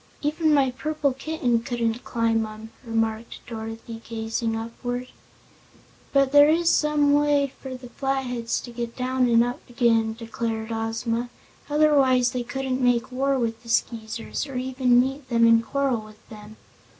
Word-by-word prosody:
"Even 310 +2 +1
my 275 -3 +3
purple 295 +1 -1
kitten 270 -4 -1
couldn't 235 -1 -2
climb 230 -1 +1
'em," 215 +1 -9
remarked 225 -1 -2
Dorothy, 225 0 -7
gazing 225 0 -3
upward. 245 +2 -5 1.0
"But 275 -1 +3
there 290 +1 +7
is 335 +2 +3
some 300 -1 +3
way 290 -2 +2
for 260 -1 -6
the 250 -1 -10
Flatheads 250 -4 -2
to 240 - -9
get 235 0 -5
down 255 0 +1
and 230 0 +5
up 245 +1 -3
again," 230 -2 +2
declared 225 -1 -4
Ozma; 230 +1 -2 0.4
"otherwise 275 -5 +4
they 250 -1 -2
couldn't 265 +1 -3
make 245 -1 +2
war 270 +2 +1
with 230 -2 -2
the 230 - -13
Skeezers, 230 +4 -2
or 270 - -8
even 255 -1 +2
meet 265 +2 -1
them 230 -1 +4
and 230 0 +5
quarrel 270 -2 0
with 215 0 -16
them." 215 0 -11
245 Hz, 150 wpm, -24 LUFS, 230-270 Hz, 1.0 s, there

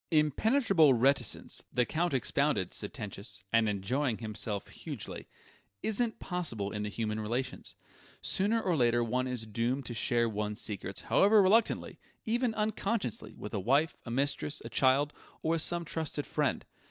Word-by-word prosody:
"Impenetrable 160 - +4
reticence," 130 -1 +1
the 125 - +2
Count 170 +6 0
expounded, 130 -4 +1
sententious 100 -1 -5
and 115 -1 +4
enjoying 115 +5 0
himself 105 -2 -3
hugely - - -7 0.6
"isn't 220 +1 0
possible 120 - -3
in 105 - -3
the 105 - -2
human 110 0 -2
relations. 120 +5 -3 0.4
Sooner 210 +4 +1
or 185 -6 +1
later 120 -3 +3
one 125 +3 0
is 125 -3 -3
doomed 120 +5 -1
to 120 - -5
share 120 0 +1
one's 105 0 -2
secrets, 105 -5 -2
however 210 +2 +5
reluctantly, 210 +4 +3 0.3
even 235 0 +1
unconsciously, 210 - -2
with 105 - -8
a 105 - 0
wife, 140 - +2
a - - -8
mistress, 140 +4 0
a - - -5
child, 140 +2 +3 0.3
or 160 - +1
with 165 -1 +2
some 170 +1 0
trusted 155 -2 -3
friend. - - -1
130 Hz, 150 wpm, -31 LUFS, 110-170 Hz, 0.6 s, however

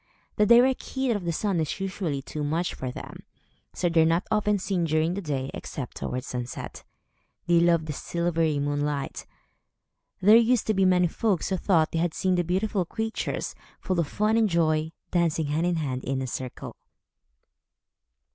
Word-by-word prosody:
The 210 - +4
direct 245 +3 +5
heat 265 -2 -2
of 205 -5 -2
the 170 - 0
sun 190 +1 0
is 160 +4 -2
usually 185 -7 -3
too 150 +2 -5
much 165 +4 -1
for 130 - -5
them, 125 - -8 0.5
so 180 - 0
they 165 -1 +3
are - - +5
not 165 +3 +1
often 210 -1 +2
seen 185 -2 -1
during 160 +2 +1
the 200 - -3
day, 140 -5 -3
except 135 -4 -6
towards 125 +1 -4
sunset. 125 -1 -6 0.6
They 175 -1 +4
love 170 -2 +3
the 155 - -4
silvery 165 -1 0
moonlight. 145 0 -2 0.9
There 210 +4 +7
used 235 0 +4
to 215 - +1
be 195 -1 +3
many 180 -1 +4
folks, 195 0 0
who 190 - 0
thought 165 -4 +2
they 165 - -1
had 170 -1 0
seen 185 -1 +1
the 175 -1 +2
beautiful 190 +3 0
creatures, 220 +6 -3 0.3
full 185 -3 -1
of 165 - +1
fun 215 +7 +1
and 220 -2 +3
joy, 160 -2 +1 0.2
dancing 165 -3 +1
hand 155 +4 0
in 175 - +1
hand, 130 -5 -3
in 135 0 -2
a - - -2
circle. 130 0 -6
170 Hz, 180 wpm, -26 LUFS, 155-195 Hz, 0.9 s, There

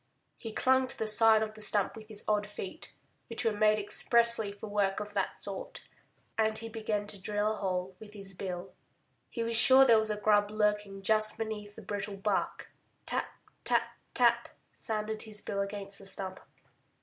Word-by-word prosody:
He 225 - -7
clung 260 +3 +2
to 260 - -7
the 220 - -2
side 220 0 +6
of 215 0 -5
the 215 - -11
stump 205 -2 +1
with 220 -1 -11
his 215 -2 -6
odd 210 -1 0
feet, 205 - -8 0.3
which 230 +1 -5
were 225 - +3
made 215 0 +2
expressly 230 +1 +4
for 205 +1 -10
work 205 -2 -1
of 210 0 -7
that - - -2
sort. - - -7 0.6
And 220 0 +2
he 225 0 -4
began 215 -2 -3
to 205 -2 -2
drill 210 +2 -1
a - - -7
hole 185 -1 -3
with 210 -1 -13
his 195 -2 -6
bill. 180 0 -6 0.6
He 230 - -4
was 230 0 -1
sure 260 +3 +8
there 230 -3 +5
was 220 0 -1
a 210 - -2
grub 205 -1 +2
lurking 210 -2 -1
just 215 +1 +1
beneath 210 -2 -6
the 225 - -11
brittle 200 0 -5
bark. 195 0 -2 0.3
Tap, - - -2 0.4
tap, - - +1 0.2
tap! - - +3 0.2
sounded 215 0 -4
his 215 -1 -2
bill 200 -1 -3
against 200 0 -4
the 195 - -8
stump. 190 -1 -4
210 Hz, 185 wpm, -30 LUFS, 200-220 Hz, 0.6 s, sure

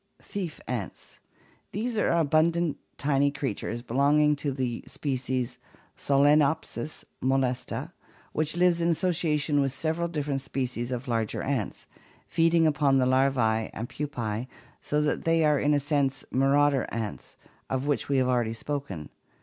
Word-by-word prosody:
Thief 185 -6 -5
ants. 120 -7 -5 0.5
These 230 +4 -2
are 210 - +2
abundant 165 0 +2 0.2
tiny 140 -1 +2
creatures, 120 -4 -4
belonging 145 +4 +3
to 140 0 -2
the 130 -3 -3
species 130 -3 -2 0.4
Solcnopsis 145 -1 +2 0.2
molesta, 130 -1 -1 0.4
which 155 +2 0
live 175 -1 +3
in 170 - +2
association 160 -4 +1
with 135 -1 +1
several 160 +4 -1
different 145 -4 -2
species 125 -3 -3
of 125 +1 -4
larger 115 -3 -1
ants, 130 -7 -2 0.4
feeding 165 0 +3
upon 145 -3 +3
the 130 - +3
larvae 130 -4 +2
and 115 - -4
pupae, 120 -6 -3 0.3
so 150 0 0
that 150 0 0
they 165 -1 +3
are 150 -2 +3
in 145 - +2
a - - +3
sense 140 -2 0
marauder 140 +1 +3
ants, 110 -3 -5 0.3
of 130 +1 -1
which 145 -1 0
we 140 - +2
have 130 -1 +3
already 120 -3 +1
spoken. 115 - -5
140 Hz, 140 wpm, -27 LUFS, 125-150 Hz, 0.5 s, belonging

